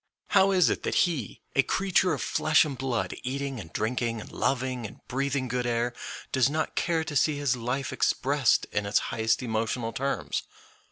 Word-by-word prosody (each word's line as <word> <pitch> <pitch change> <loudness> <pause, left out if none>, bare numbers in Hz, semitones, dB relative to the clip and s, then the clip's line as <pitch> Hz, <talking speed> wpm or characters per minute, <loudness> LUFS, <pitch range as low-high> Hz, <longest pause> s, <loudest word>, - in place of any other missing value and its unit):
How 195 -1 +5
is 185 -3 +4
it - - -2
that - - -2
he, 155 - -4
a 135 - +6
creature 190 +4 +2
of 150 - -1
flesh 160 +1 +3
and 145 -3 -4
blood, 130 -3 -2
eating 135 0 -3
and 85 -5 -9
drinking 115 0 -1
and - - -10
loving 130 -3 -1
and - - -14
breathing 135 0 -1
good 125 0 -1
air, 120 +1 0 0.4
does 130 0 +3
not 155 +2 -1
care 165 -2 +1
to 150 -1 -6
see 150 +1 +3
his 140 -3 +1
life 125 +2 -2
expressed 140 -2 +2
in 105 0 -1
its 100 - +2 0.2
highest 110 +2 +1
emotional 115 0 -1
terms? 140 +1 -1
130 Hz, 180 wpm, -27 LUFS, 120-145 Hz, 0.4 s, a